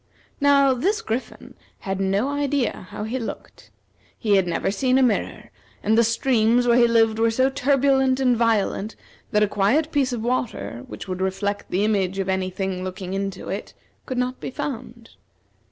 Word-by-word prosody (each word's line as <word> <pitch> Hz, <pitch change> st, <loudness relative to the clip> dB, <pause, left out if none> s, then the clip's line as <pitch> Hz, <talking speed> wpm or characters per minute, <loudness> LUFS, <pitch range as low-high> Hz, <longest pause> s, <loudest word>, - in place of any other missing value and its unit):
Now, 280 Hz, -2 st, +5 dB
this 385 Hz, -, 0 dB
Griffin 245 Hz, -, -5 dB, 0.3 s
had 195 Hz, 0 st, -3 dB
no 195 Hz, +6 st, +1 dB
idea 285 Hz, -8 st, -1 dB
how 210 Hz, -, -6 dB
he 235 Hz, +5 st, -3 dB
looked. 230 Hz, -, -8 dB, 0.5 s
He 210 Hz, -4 st, +2 dB
had 190 Hz, -2 st, +2 dB
never 175 Hz, +2 st, -1 dB
seen 255 Hz, +5 st, +1 dB
a 265 Hz, -, +4 dB
mirror, 230 Hz, -5 st, -1 dB, 0.3 s
and 215 Hz, +2 st, +3 dB
the 235 Hz, -, +5 dB
streams 230 Hz, 0 st, +2 dB
where 240 Hz, -1 st, +4 dB
he 235 Hz, -, +6 dB
lived 225 Hz, -1 st, +3 dB
were 230 Hz, 0 st, +4 dB
so 260 Hz, +4 st, +2 dB
turbulent 265 Hz, -1 st, +2 dB
and 250 Hz, -2 st, +3 dB
violent 220 Hz, -2 st, 0 dB, 0.3 s
that 210 Hz, 0 st, +2 dB
a -, -, +3 dB
quiet 230 Hz, +11 st, +1 dB
piece 275 Hz, -4 st, +1 dB
of 235 Hz, -3 st, -3 dB
water, 125 Hz, -, -2 dB
which 105 Hz, -, -9 dB
would 185 Hz, 0 st, -4 dB
reflect 200 Hz, +2 st, -2 dB
the 190 Hz, +3 st, 0 dB
image 195 Hz, -3 st, 0 dB
of 195 Hz, -1 st, -2 dB
any 190 Hz, 0 st, 0 dB
thing 185 Hz, 0 st, -3 dB
looking 185 Hz, 0 st, -5 dB
into 195 Hz, -1 st, -4 dB
it, 195 Hz, -, -5 dB, 0.3 s
could 255 Hz, -, -4 dB
not 250 Hz, +1 st, -1 dB
be -, -, -5 dB
found. 250 Hz, -4 st, -6 dB
225 Hz, 180 wpm, -23 LUFS, 195-260 Hz, 0.5 s, he